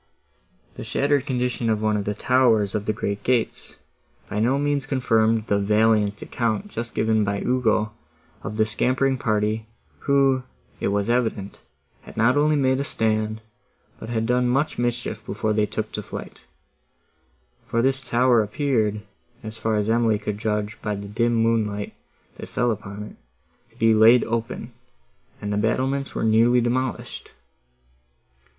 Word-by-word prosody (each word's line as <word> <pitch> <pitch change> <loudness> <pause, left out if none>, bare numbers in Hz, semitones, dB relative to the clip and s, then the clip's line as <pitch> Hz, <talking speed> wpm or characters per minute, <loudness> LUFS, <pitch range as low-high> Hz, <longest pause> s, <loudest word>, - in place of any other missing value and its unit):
The - - -6
shattered 145 0 0
condition 125 -2 -1
of 110 -1 +1
one 110 0 +2
of 100 -1 -2
the 105 - -2
towers 115 -4 +3
of 105 -1 -3
the - - +3
great 100 -1 -3
gates 120 0 -1 0.5
by 105 - -3
no 125 +5 +2
means 145 -1 0
confirmed 115 -5 +2
the 100 -2 +1
valiant 105 0 +2
account 120 - -2
just 120 -10 -6
given 110 -1 +2
by 100 0 -1
Ugo 110 -4 +1 0.5
of 105 - -6
the 110 - +3
scampering 130 +4 0
party, 110 0 0 0.3
who, 135 -2 +3 0.4
it - - -1
was 100 +1 0
evident, 115 -5 -1 0.4
had - - -14
not 115 +4 +4
only 150 +1 +3
made 130 -2 +2
a - - 0
stand, 110 -3 -1 0.6
but 110 - -8
had 115 -1 -1
done 125 +1 +2
much 135 +4 0
mischief 120 0 -2
before 110 +1 -2
they 105 0 +1
took 110 +1 -4
to 105 - -4
flight; - - -8 1.3
for 115 0 0
this 135 +1 +1
tower 120 -1 +3
appeared, 110 -2 0 0.4
as 110 +1 -8
far 110 -1 0
as 105 0 0
Emily 115 -1 +2
could 105 0 -4
judge 105 -1 -2
by 105 -1 -2
the 100 0 -7
dim 115 +3 0
moonlight 110 -3 0 0.4
that - - -8
fell 120 -1 +1
upon 100 -1 -6
it, 105 - -11 0.5
to - - -26
be 115 0 +4
laid 115 +3 +6
open, 115 0 -4 0.7
and 105 0 -3
the - - 0
battlements 130 +6 -1
were - - -1
nearly 115 +3 +4
demolished. 125 0 -2
115 Hz, 155 wpm, -23 LUFS, 105-125 Hz, 1.3 s, laid